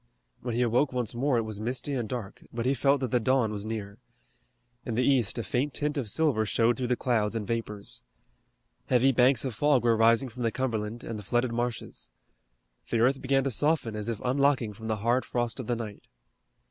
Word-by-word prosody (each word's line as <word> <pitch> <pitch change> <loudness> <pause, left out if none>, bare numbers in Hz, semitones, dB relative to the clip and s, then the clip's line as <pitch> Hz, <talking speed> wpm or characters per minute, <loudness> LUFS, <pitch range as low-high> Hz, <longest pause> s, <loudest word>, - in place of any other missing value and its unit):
When 120 -2 -3
he 125 - +2
awoke 125 +4 +2
once 125 -4 -2
more 130 +2 +1
it 115 - +1
was 110 -2 -6
misty 125 +5 -2
and 120 -5 -2
dark, 115 -6 -5
but 115 0 -3
he 130 - +3
felt 140 0 +2
that 130 -4 -2
the 125 - +3
dawn 120 -1 +2
was 105 0 -5
near. 105 -2 -5 0.8
In 115 - -3
the 125 +2 +2
east 125 -7 +2
a 115 - -2
faint 125 +8 -1
tint 150 +1 -1
of 130 -7 -2
silver 145 -5 +2
showed 115 +2 +2
through 125 -2 -2
the 125 - +2
clouds 115 -4 0
and 110 -2 -2
vapors. 105 -2 -4 0.9
Heavy 130 +2 +4
banks 130 0 +4
of 130 - -2
fog 140 +1 +3
were 115 -1 +4
rising 115 +3 +4
from 125 +2 -9
the 115 -1 +1
Cumberland 115 -2 -3
and 110 -2 -5
the - - -9
flooded 120 +4 0
marshes. 120 0 -3 0.8
The - - +1
earth 130 +4 +3
began 135 0 +2
to 135 - -1
soften 145 -3 +1
as 105 +1 -3
if 115 -3 -3
unlocking 130 -4 +2
from 110 +2 -9
the 110 - 0
hard 120 +2 +3
frost 120 +1 -2
of 125 - -5
the 120 - +1
night. 110 -3 -6
120 Hz, 215 wpm, -28 LUFS, 110-130 Hz, 0.9 s, Heavy